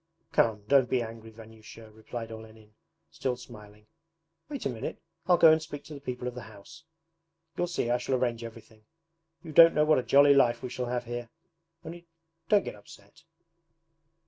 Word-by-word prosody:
'Come, 110 -2 +1
don't 135 -1 +4
be 125 -2 +1
angry, 115 0 -10
Vanyusha,' 110 0 -14
replied 115 +1 -8
Olenin, 110 -1 -13 0.4
still 125 -2 -3
smiling. 105 -3 -14 0.6
'Wait 285 -3 -6
a - - +1
minute, 115 -3 -6 0.3
I'll 180 -1 +5
go 165 -1 +7
and 160 0 +3
speak 150 -2 -8
to 155 - -11
the 140 - -10
people 125 -2 -5
of 125 - -4
the 125 - -8
house; 160 +11 -15 0.7
you'll 175 - -1
see 170 -9 -2
I 125 - +1
shall 130 +2 -1
arrange 120 -2 -1
everything. 110 -1 -12 0.6
You 165 - -9
don't 165 +2 +7
know 150 - +3
what 155 -3 +4
a - - -3
jolly 140 +2 +6
life 120 -3 +3
we 125 - -4
shall 125 0 -4
have 125 0 -3
here. 120 0 -6 0.6
Only 170 +1 -10 0.4
don't 205 -2 +4
get - - -5
upset.' 100 +2 -17
120 Hz, 180 wpm, -28 LUFS, 110-145 Hz, 0.7 s, go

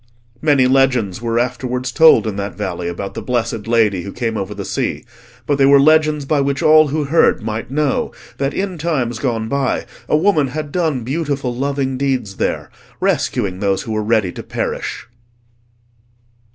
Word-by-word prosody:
Many 145 -4 +4
legends 125 -6 +2
were 115 -1 -1
afterwards 125 +1 -2
told 160 -1 +6
in 110 -2 -3
that 100 0 -4
valley 90 -4 -3
about 95 +3 -5
the - - -5
blessed 115 -3 -2
Lady 110 -5 +2
who 100 - -7
came 115 -1 -3
over 105 0 -4
the - - -6
sea, - - -3 0.4
but 145 -1 0
they 135 - +5
were 140 0 +7
legends 155 0 +3
by 145 0 +1
which 140 0 -1
all 155 0 +6
who 150 +2 -1
heard 145 -5 +2
might 110 +1 -4
know 145 0 0 0.3
that 135 0 0
in 190 -1 -3
times 130 -8 -1
gone 115 -4 -1
by 140 0 -1 0.2
a 150 - +4
woman 155 -4 +2
had 150 +2 -5
done 155 -8 -1
beautiful 140 -2 -2
loving 135 0 -2
deeds 130 -8 -1
there, - - -2 0.3
rescuing 95 -2 0
those 100 -1 0
who 115 - -6
were 110 0 0
ready 105 -4 +1
to - - -8
perish. - - -4
130 Hz, 175 wpm, -18 LUFS, 110-145 Hz, 0.4 s, were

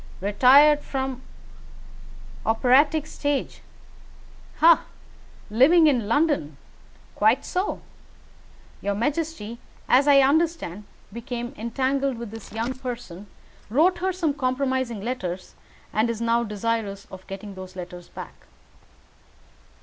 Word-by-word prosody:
Retired 270 +9 +5
from 265 -2 -4 1.2
operatic 275 +7 +3
stage 290 -2 -3 1.0
ha! 335 +1 +6 0.7
Living 305 +9 +5
in 250 -8 +2
London 270 - +1 0.6
quite 225 +6 +2
so! 370 +3 -2 1.0
Your 200 0 -1
majesty, 245 -2 -3 0.3
as 270 +3 +4
I 280 -1 +7
understand, 280 - 0 0.3
became 240 +2 -5
entangled 265 +3 -1
with 235 -3 -7
this 225 -1 -10
young 230 +4 -2
person, 240 -7 -7 0.4
wrote 340 - +3
her 375 +1 0
some 340 -5 -1
compromising 260 -4 -1
letters, 190 -6 -5 0.4
and 220 +2 +1
is 230 -2 -3
now 235 0 +1
desirous 210 -2 -3
of 190 0 -11
getting 195 +1 -8
those 185 -1 -10
letters 180 -1 -9
back." - - -11
245 Hz, 105 wpm, -24 LUFS, 210-285 Hz, 1.2 s, I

